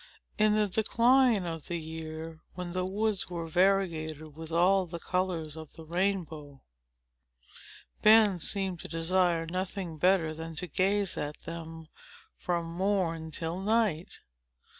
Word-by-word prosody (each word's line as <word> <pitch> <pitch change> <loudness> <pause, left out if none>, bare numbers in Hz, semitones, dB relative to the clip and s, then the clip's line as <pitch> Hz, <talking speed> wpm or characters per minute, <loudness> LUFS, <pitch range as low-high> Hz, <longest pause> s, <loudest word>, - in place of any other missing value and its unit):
In 215 0 +4
the 210 -1 +3
decline 230 +1 +3
of 165 -3 -5
the 175 - -2
year, 160 0 -7 0.2
when 180 -1 -5
the 185 +1 -1
woods 205 0 -1
were 170 -2 -4
variegated 160 -4 +1
with 160 0 -7
all 185 +3 +3
the 170 0 -5
colors 170 -3 -2
of 160 -2 -10
the 160 - -10
rainbow, 160 -5 -2 1.4
Ben 215 -3 +6
seemed 190 +1 0
to - - -7
desire 170 0 +1
nothing 180 -1 -4
better 180 -2 +3
than 160 +1 -7
to 180 +4 -4
gaze 195 +3 +1
at 150 0 -4
them 165 -1 -7 0.5
from 170 -1 -2
morn 170 -2 -1
till 165 +3 -4
night. 205 -5 0
175 Hz, 135 wpm, -30 LUFS, 160-195 Hz, 1.4 s, Ben